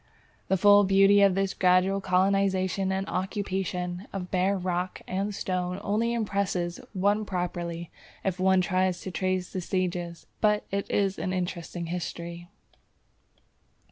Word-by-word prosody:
_ - - -38
The 190 - +2
full 205 +2 +7
beauty 195 +1 +5
of 195 -2 +5
this 195 0 0
gradual 185 +2 +3
colonization 190 0 +1
and 190 0 -2
occupation 185 -1 -3
of 185 -2 -5
bare 190 +2 +2
rock 180 0 -3
and 195 +3 -2
stones 180 0 -2
only 220 +3 0
impresses 200 -6 -1
one 205 +2 +2
properly 175 -3 -4 0.3
if 190 -1 -1
one 190 0 +4
tries 185 -1 0
to 190 - -6
trace 185 0 -1
the 185 - -2
stages, 175 -2 -3 0.2
but 210 -1 +3
it 200 0 -2
is 195 -1 0
an 185 - -2
interesting 175 -1 -3
history. 170 0 -5
185 Hz, 140 wpm, -27 LUFS, 180-195 Hz, 0.3 s, full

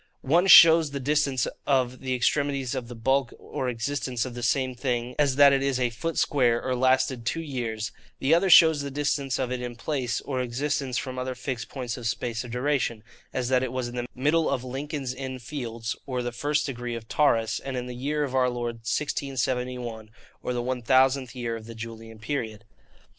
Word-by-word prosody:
One 170 +7 +3
shows 165 -4 +9
the 140 0 -4
distance 140 -1 +1 0.2
of 130 -2 +1
the 130 -1 -2
extremities 140 0 0
of 130 -3 -4
the 120 - -8
bulk 130 +2 0
or 130 - -4
existence 125 0 -2
of 125 - -6
the 120 - -6
same 130 +2 +1
thing, 125 -1 -2
as 140 -3 +3
that 140 0 +7
it 135 - +2
is 135 -2 0
a 125 -2 +1
foot 160 +8 -4
square, 120 -5 +2
or 130 +1 -2
lasted 130 -1 +2
two 145 +8 -1
years; 115 -6 -3 0.3
the 140 +4 +2
other 180 +3 +3
shows 160 -3 +7
the 140 - -4
distance 140 -1 -1
of 130 -1 -2
it 125 -1 -2
in 120 -1 -5
place, 125 -2 -2
or 130 -3 -2
existence 130 +1 -2
from 130 -1 -4
other 130 0 -3
fixed 125 -1 -5
points 125 -3 -4
of 120 -2 -4
space 115 0 -2
or - - -8
duration, 125 -2 -1 0.3
as 125 -1 -2
that 130 -1 +3
it 130 -2 -2
was 130 -1 -3
in 120 - -9
the 120 0 -3
middle 150 +5 +2
of 130 -3 -1
Lincoln's 135 0 -4
Inn 130 0 -5
Fields, 120 -3 -5
or 125 -2 -2
the 120 - -3
first 145 +5 0
degree 120 -3 -4
of 115 -1 -8
Taurus, 115 -7 +2
and 135 -2 -5
in 125 - -3
the 125 - -6
year 145 +4 -1
of 135 -3 -3
our 130 -1 +3
Lord 120 -1 -3
1671, 125 -3 -2 0.3
or - - -3
the 120 -1 -2
1000th 130 +1 +2
year 120 -2 -3
of 110 -1 -9
the 115 - -9
Julian 115 0 -8
period. 110 -2 -4
130 Hz, 205 wpm, -26 LUFS, 120-140 Hz, 0.3 s, shows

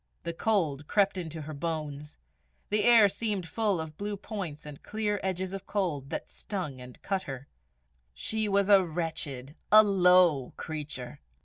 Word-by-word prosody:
The 170 - -3
cold 160 -7 0
crept 200 -1 +2
into 165 -3 -5
her 155 +1 -7
bones; 150 -1 -4 0.5
the 210 0 +3
air 230 -3 +8
seemed 200 -3 -2
full 210 -2 0
of 155 -1 -6
blue 205 0 -3
points 185 -8 -6
and 150 -2 -9
clear 210 -1 -2
edges 190 0 -2
of 195 0 -7
cold, 165 -10 -2
that - - -4
stung 165 -11 -5
and 125 0 -11
cut 195 -1 -1
her. 135 -5 -7 0.6
She 220 -1 -2
was 200 0 +3
a 200 -2 +7
wretched, 155 -5 -4 0.2
a 215 +1 +9
low 180 -8 +4
creature! 145 -4 -6
180 Hz, 155 wpm, -29 LUFS, 150-200 Hz, 0.6 s, a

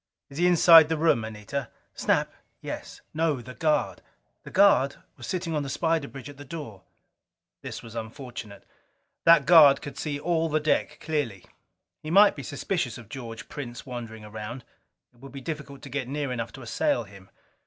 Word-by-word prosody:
"Is 140 - -7
he 175 - +4
inside 165 -2 +8
the 160 - 0
room, 150 -8 +3
Anita?" 110 +4 -5 0.2
"Snap? - - 0 0.3
Yes." - - -7
"No 155 -3 +1
the 125 +1 -10
guard." 155 +1 0 0.4
"The - - -11
guard 165 -9 +4 0.2
was 120 - -9
sitting 175 -3 -2
on 150 - 0
the 140 - -5
spider 160 +1 0
bridge 135 -4 -10
at 145 -1 -11
the 145 - -9
door." 135 - -8 0.8
This - - -7
was 115 - -11
unfortunate. 115 -3 -8 0.6
That 165 -4 +7
guard 155 -5 +8
could 145 - -8
see 145 -2 -3
all 165 +1 0
the 155 0 +1
deck 150 0 0
clearly. 145 - -2 0.6
He 155 - -7
might 200 +4 +6
be 140 - -6
suspicious 140 - -3
of 120 -4 -13
George 115 -4 -8
Prince 125 -4 -7
wandering 115 -4 -7
around: 110 +4 -7 0.5
it 120 - -26
would 135 +1 -11
be 140 - -8
difficult 140 -1 -7
to 140 - -8
get 135 -1 -3
near 140 0 -3
enough 115 -2 -3
to - - -10
assail - - 0
him. 95 -1 -15
140 Hz, 180 wpm, -26 LUFS, 120-155 Hz, 0.8 s, inside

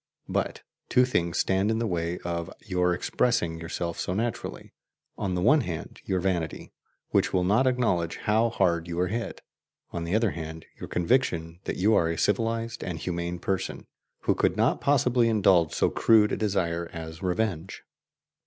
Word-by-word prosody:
But - - -2 0.3
two 125 0 +5
things 85 -9 0
stand 95 +2 +2
in 110 - +1
the 115 - 0
way 85 -3 -1
of 85 +1 -3
your 90 -3 +1
expressing 90 -2 0
yourself 85 +1 -4
so 90 - -2
naturally: 115 +2 -4 0.4
on 95 -2 -2
the 90 - -1
one 145 +7 +5
hand, 85 -9 -6
your 95 -1 0
vanity, 85 -3 -2 0.4
which - - +2
will 90 - +2
not 110 +8 +3
acknowledge 115 -10 +1
how 110 +3 +2
hard 85 -6 +1
you 85 0 -3
are 90 0 +1
hit; 115 +3 -4 0.5
on 85 - -3
the 85 +4 -1
other 110 -2 +2
hand, 80 -1 -7
your - - -7
conviction 85 -5 0
that - - -3
you 105 +5 +3
are 85 -5 +3
a 85 - -2
civilized 115 +2 0
and 90 -3 -4
humane 85 +1 -3
person, 95 +1 -3 0.4
who - - +2
could - - +1
not - - +2
possibly 125 -4 +3
indulge 95 -7 +4
so - - +1
crude 110 -2 +4
a - - +1
desire 85 -5 -1
as 80 -1 -8
revenge. 95 -1 -2
90 Hz, 170 wpm, -27 LUFS, 85-110 Hz, 0.5 s, two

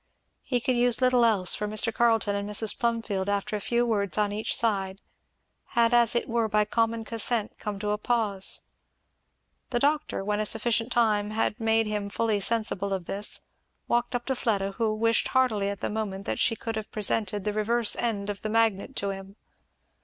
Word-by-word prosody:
He 250 -2 -1
could 255 +1 0
use 240 0 +2
little 255 -2 +3
else, 205 -6 +4
for 210 - -1
Mr. 215 +2 +1
Carleton 225 -3 +2
and 200 0 -3
Mrs. 210 +1 +3
Plumfield 225 -5 -1
after 205 +1 -1
a 210 - -3
few 240 +3 +1
words 205 -4 -1
on 210 -1 +1
each 215 +2 0
side, 195 -4 0 0.8
had 235 0 +4
as 240 -1 +4
it 235 - 0
were 230 -1 0
by 210 0 +2
common 225 +1 0
consent 225 -1 -1
come 210 -2 -4
to 205 +1 -2
a 210 - -1
pause. 210 -5 +1 1.1
The 245 - -1
doctor, 290 -4 0
when 210 +1 -1
a 215 - 0
sufficient 225 +2 +1
time 215 -3 +2
had 215 0 -1
made 225 0 +2
him 210 -1 -3
fully 220 0 0
sensible 200 -2 0
of 185 -3 -3
this, 200 +4 -2 0.5
walked 240 +1 0
up 240 0 -3
to 265 - -1
Fleda, 200 -5 -1
who 220 +2 -1
wished 230 +1 +2
heartily 225 -7 +1
at 200 - -6
the - - -1
moment 200 -3 -4
that - - -3
she 230 - +2
could 225 0 -5
have 220 -1 -6
presented 210 -1 0
the 210 - -2
reverse 225 +2 +2
end 210 -4 -2
of 200 - -8
the 215 - -3
magnet 225 +2 +1
to 200 0 -1
him. 195 0 -9
215 Hz, 195 wpm, -27 LUFS, 205-235 Hz, 1.1 s, else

